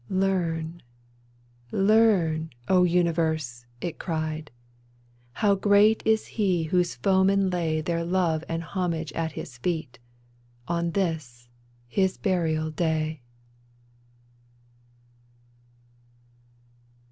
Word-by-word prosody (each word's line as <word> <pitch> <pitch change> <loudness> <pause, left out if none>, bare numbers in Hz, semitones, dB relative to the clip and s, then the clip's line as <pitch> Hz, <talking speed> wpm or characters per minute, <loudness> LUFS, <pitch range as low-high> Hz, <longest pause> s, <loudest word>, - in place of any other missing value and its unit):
" - - -27
Learn, 175 -4 -1 0.9
learn, 195 -7 +3 0.2
O 185 -1 +4
universe," 160 -8 0
it 170 - -4
cried, 155 -2 -3 0.5
" 120 0 -34
How 205 -2 +5
great 205 +2 +4
is 220 0 +3
he 185 -6 0
whose 175 +2 0
foemen 195 0 +2
lay 160 -3 0
Their 170 +1 -1
love 170 -3 0
and 165 0 -2
homage 165 -4 -3
at 160 -1 -2
his 120 -4 -8
feet, 160 -5 -3 0.7
On 170 0 0
this 150 -11 -3
— 120 0 -34
his 190 +9 0
burial 160 -5 0
day 155 -2 -1
165 Hz, 100 wpm, -26 LUFS, 155-185 Hz, 0.9 s, How